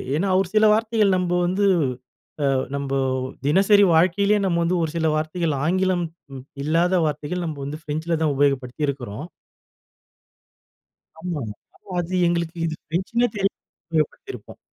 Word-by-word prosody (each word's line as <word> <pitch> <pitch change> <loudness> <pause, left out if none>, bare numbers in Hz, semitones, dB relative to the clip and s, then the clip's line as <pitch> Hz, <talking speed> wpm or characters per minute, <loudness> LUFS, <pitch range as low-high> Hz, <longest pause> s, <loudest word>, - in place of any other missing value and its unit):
ஏன்னா 190 +5 0
ஒரு 195 - 0
சில 215 0 +5
வார்த்தைகள் 215 -3 +2
நம்ப 180 -1 -1
வந்து, 190 +3 +1 0.8
அ - - +3 0.3
நம்ப 140 -1 -3 0.5
தினசரி 200 +6 +5
வாழ்க்கையிலயே 200 +5 +3
நம்ம 170 -2 +1
வந்து, 175 +2 +1
ஒரு 160 - -2
சில 160 -1 +1
வார்த்தைகள், 155 +1 -1
ஆங்கிலம் 185 0 +1 0.3
ம் 130 - -8 0.2
இல்லாத 170 +4 +2
வார்த்தைகள் 155 +4 -3
நம்ப 155 -3 -5
வந்து 150 +3 -6
ஃப்ரெஞ்சில 160 +2 -2
தான் 150 - +2
உபயோகப்படுத்தியிருக்கிறோம். 135 -2 -1 1.9
ஆமா, 165 -3 -4 0.4
ஆமா. 190 - -13
அது 175 +2 -4
எங்களுக்கு 170 0 -1
இது 160 - -2
ஃபிரென்ச்சுன்னே 190 +9 0
தெரியாம 195 -1 0 0.4
உபயோகப்படுத்தியிருப்போம் 160 - -3
170 Hz, 130 wpm, -23 LUFS, 150-190 Hz, 1.9 s, சில